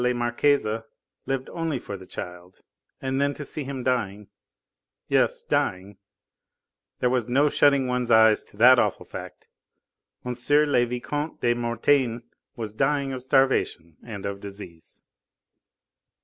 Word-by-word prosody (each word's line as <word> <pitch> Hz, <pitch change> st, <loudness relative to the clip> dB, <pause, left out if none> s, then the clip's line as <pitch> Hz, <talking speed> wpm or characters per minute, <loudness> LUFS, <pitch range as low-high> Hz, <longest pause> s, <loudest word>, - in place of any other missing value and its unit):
la 125 Hz, 0 st, +2 dB
Marquise 120 Hz, +4 st, +1 dB, 0.6 s
lived 135 Hz, -1 st, -2 dB
only 165 Hz, -4 st, -2 dB
for 100 Hz, -, -7 dB
the 95 Hz, -1 st, -11 dB
child, 90 Hz, +1 st, -9 dB, 0.4 s
and 135 Hz, +1 st, -1 dB
then 140 Hz, 0 st, +1 dB
to 150 Hz, -, -7 dB
see 150 Hz, -, -5 dB
him 135 Hz, -1 st, -5 dB
dying 105 Hz, -6 st, -1 dB, 0.8 s
yes, -, -, +1 dB
dying, 95 Hz, +2 st, -1 dB, 1.1 s
there 125 Hz, -, +3 dB
was 125 Hz, -3 st, 0 dB
no 140 Hz, +4 st, +3 dB
shutting 140 Hz, -2 st, +4 dB
one's 125 Hz, -1 st, -1 dB
eyes 110 Hz, -1 st, +5 dB
to -, -, -20 dB
that 125 Hz, +3 st, +7 dB
awful -, -, 0 dB
fact -, -, -10 dB, 0.8 s
M. 125 Hz, -, -2 dB, 0.2 s
le 145 Hz, -4 st, +4 dB
Vicomte 145 Hz, +6 st, -4 dB
de 120 Hz, -1 st, +3 dB
Mortain 120 Hz, +1 st, +1 dB, 0.3 s
was 110 Hz, -3 st, -5 dB
dying 135 Hz, +3 st, 0 dB
of 130 Hz, -, -5 dB
starvation 130 Hz, -, +1 dB
and 100 Hz, -4 st, -8 dB
of 100 Hz, 0 st, -4 dB
disease. 100 Hz, -5 st, -11 dB
125 Hz, 135 wpm, -25 LUFS, 105-135 Hz, 1.1 s, that